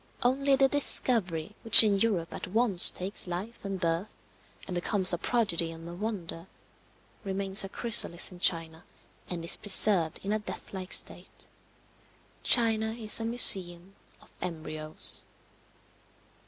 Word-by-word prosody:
Only 270 +3 -1
the 270 0 0
discovery 210 - -3
which 225 - +9
in 205 -2 -2
Europe 195 -7 -4
at - - -9
once 205 -2 +3
takes 190 +1 -3
life 185 +7 -9
and 195 -1 -8
birth, 170 +4 -5 0.5
and 185 - -9
becomes 185 +1 +1
a - - -3
prodigy 200 -9 -3
and 165 0 -13
a 170 - -11
wonder, 180 -4 -9 0.8
remains 195 0 0
a 195 - -9
chrysalis 215 -7 +1
in 180 - -16
China, 165 -1 -1 0.5
and 170 -2 -8
is - - +3
preserved 190 -5 +6
in 200 - -6
a 215 - -3
deathlike 190 -3 -11
state. - - -4 1.0
China 220 -2 -1
is 225 -1 -3
a 225 - -7
museum 190 -6 +3 0.3
of - - -25
embryos. 155 -3 -4
195 Hz, 135 wpm, -25 LUFS, 170-220 Hz, 1.0 s, which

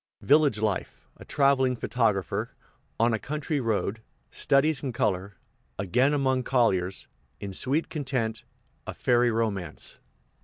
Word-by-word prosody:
Village 145 -6 +4
life 105 -3 -3
A - - -11
traveling 135 -3 +2
photographer 110 -6 0 0.5
On 115 +1 +3
a 110 - 0
country 150 +2 -2
road 110 -2 -1 0.3
Studies 145 +1 +2
in 135 -4 -3
color 100 -3 -1 0.4
Again 125 +9 +2
among 135 -3 +1
colliers 95 -8 +1 0.3
In 100 -1 -6
sweet 140 - 0
content 125 -7 -2 0.4
A - - -5
ferry 120 -1 +3
romance. 110 -5 -3
120 Hz, 120 wpm, -27 LUFS, 105-135 Hz, 0.5 s, Village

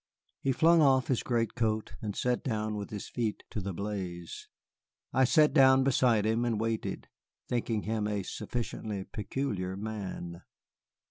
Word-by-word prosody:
He 135 - +1
flung 165 +5 +5
off 130 -4 +4
his 130 - +2
greatcoat 115 -2 0
and 105 -3 -4
sat 125 -1 0
down 110 -5 -1
with 105 -1 -5
his 105 -2 -6
feet 115 -4 -2
to 105 - -3
the 100 +1 -3
blaze. 90 -3 -5 0.7
I 130 - +5
sat 150 +3 +4
down 135 -2 +6
beside 120 -5 +3
him 110 +2 +1
and 115 -3 0
waited, 115 0 -2 0.4
thinking 115 -3 -1
him 110 -1 -1
a 105 -2 -1
sufficiently 110 -2 -4
peculiar 100 -4 -3
man. 100 -5 -5
110 Hz, 145 wpm, -30 LUFS, 105-125 Hz, 0.7 s, down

